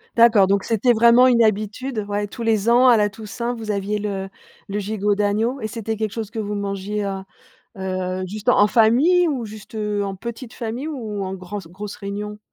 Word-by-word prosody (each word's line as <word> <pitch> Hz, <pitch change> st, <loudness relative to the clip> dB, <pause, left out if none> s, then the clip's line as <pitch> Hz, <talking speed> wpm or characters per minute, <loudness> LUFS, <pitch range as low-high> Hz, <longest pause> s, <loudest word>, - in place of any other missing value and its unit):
D'accord, 230 Hz, -4 st, +6 dB
donc 200 Hz, 0 st, +1 dB
c'était 235 Hz, +2 st, +2 dB
vraiment 235 Hz, +2 st, +6 dB
une 245 Hz, -2 st, +5 dB
habitude. 215 Hz, +2 st, 0 dB
Ouais 205 Hz, 0 st, -2 dB
tous 230 Hz, +3 st, -7 dB
les 220 Hz, -1 st, +2 dB
ans, 245 Hz, +2 st, +6 dB
à 240 Hz, -, +7 dB
la 210 Hz, -1 st, +2 dB
Toussaint, 225 Hz, +4 st, -5 dB
vous 220 Hz, -2 st, -4 dB
aviez 200 Hz, +1 st, -1 dB
le 195 Hz, -2 st, -4 dB, 0.4 s
le 200 Hz, -, -3 dB
gigot 205 Hz, 0 st, 0 dB
d'agneau 215 Hz, +6 st, 0 dB
et 220 Hz, -, -4 dB
c'était 220 Hz, 0 st, -4 dB
quelque 215 Hz, -1 st, -2 dB
chose 220 Hz, -2 st, -5 dB
que 225 Hz, -, -10 dB
vous 210 Hz, -1 st, -2 dB
mangiez, 200 Hz, +1 st, -3 dB
heu, 195 Hz, -1 st, -3 dB, 0.6 s
heu, 185 Hz, -1 st, -3 dB
juste 210 Hz, +4 st, -7 dB
en -, -, +5 dB
en 205 Hz, -, +6 dB
famille 265 Hz, -, +4 dB
ou 260 Hz, -6 st, -2 dB
juste, 215 Hz, 0 st, -11 dB
heu, 210 Hz, -1 st, -1 dB
en 195 Hz, -1 st, -4 dB
petite 235 Hz, +4 st, -7 dB
famille 240 Hz, +6 st, -4 dB
ou 220 Hz, -9 st, -4 dB
en 190 Hz, 0 st, -4 dB
grande 190 Hz, 0 st, -7 dB
grosse 200 Hz, +3 st, -8 dB
réunion? 210 Hz, +1 st, -5 dB
210 Hz, 205 wpm, -21 LUFS, 200-235 Hz, 0.6 s, à